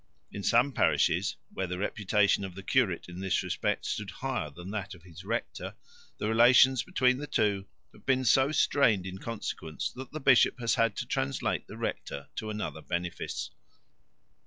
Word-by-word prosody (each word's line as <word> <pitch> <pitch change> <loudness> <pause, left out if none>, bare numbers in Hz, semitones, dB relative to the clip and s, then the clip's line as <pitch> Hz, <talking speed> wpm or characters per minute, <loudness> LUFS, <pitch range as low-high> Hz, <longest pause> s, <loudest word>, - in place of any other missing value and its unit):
In 100 - -6
some 120 +7 +3
parishes, - - +2 0.2
where 95 - -2
the 90 0 -4
reputation 100 0 +1
of 95 -2 -6
the 95 - -8
curate 105 -8 +1
in 90 0 -9
this 95 -2 0
respect - - -1
stood - - -3
higher 75 - -3
than 90 +6 -9
that 100 -1 -4
of 85 - -18
his 90 -1 -12
rector, 115 +4 -4 0.4
the - - -2
relations 120 +3 +6
between 130 -8 +2
the 150 - -5
two 100 -5 0 0.3
have - - -18
been 130 -1 +1
so 135 +5 +4
strained 120 -10 +3
in 95 0 -6
consequence 90 -9 -4
that 130 0 -9
the 155 - -5
bishop 130 -2 +4
has 115 -1 +1
had 115 -3 +2
to - - -3
translate 70 +1 -1
the - - -10
rector 70 - -4
to 110 - -3
another 105 -7 -4
benefice. 85 +1 -4
105 Hz, 175 wpm, -29 LUFS, 90-125 Hz, 0.4 s, relations